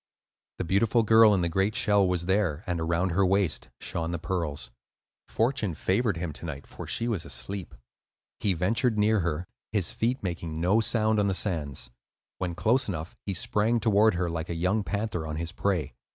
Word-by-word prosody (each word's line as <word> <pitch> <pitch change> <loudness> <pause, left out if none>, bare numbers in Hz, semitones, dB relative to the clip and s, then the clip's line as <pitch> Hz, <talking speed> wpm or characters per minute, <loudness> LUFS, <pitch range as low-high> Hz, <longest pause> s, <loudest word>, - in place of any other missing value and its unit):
The - - -2
beautiful 110 +6 +2
girl 110 0 +7
in 95 -3 +2
the 85 - +1
great 95 +5 0
shell 100 -3 +3
was 90 -1 0
there, 95 -4 +1
and 90 -3 -2
around 85 +3 +1
her 95 +4 +2
waist 95 -3 +1
shone 80 -1 -3
the 85 - -2
pearls. 80 -6 -3 0.6
Fortune 115 - 0
favored 100 +2 +1
him 85 -2 -3
to 80 - -6
night, 70 -3 -6
for - - -9
she 115 - 0
was 105 -8 -1
asleep. 95 +2 -5 0.6
He 100 - +1
ventured 110 +6 +1
near 105 +1 +3
her, 85 -1 -1 0.3
his 105 -5 0
feet 120 +2 -1
making 85 -3 -4
no 95 +6 +3
sound 110 -1 +2
on 100 - +2
the 95 - 0
sands. 75 -11 -2 0.5
When 90 -2 -2
close 125 +8 +2
enough 85 -4 -5
he 100 - -1
sprang 110 +6 +1
toward 110 -2 +4
her, 90 0 0
like 85 0 -4
a 85 - -2
young 90 +6 +1
panther 100 -6 -3
on 75 - -4
his 85 +1 -3
prey. 90 -9 -1
95 Hz, 190 wpm, -27 LUFS, 85-105 Hz, 0.6 s, girl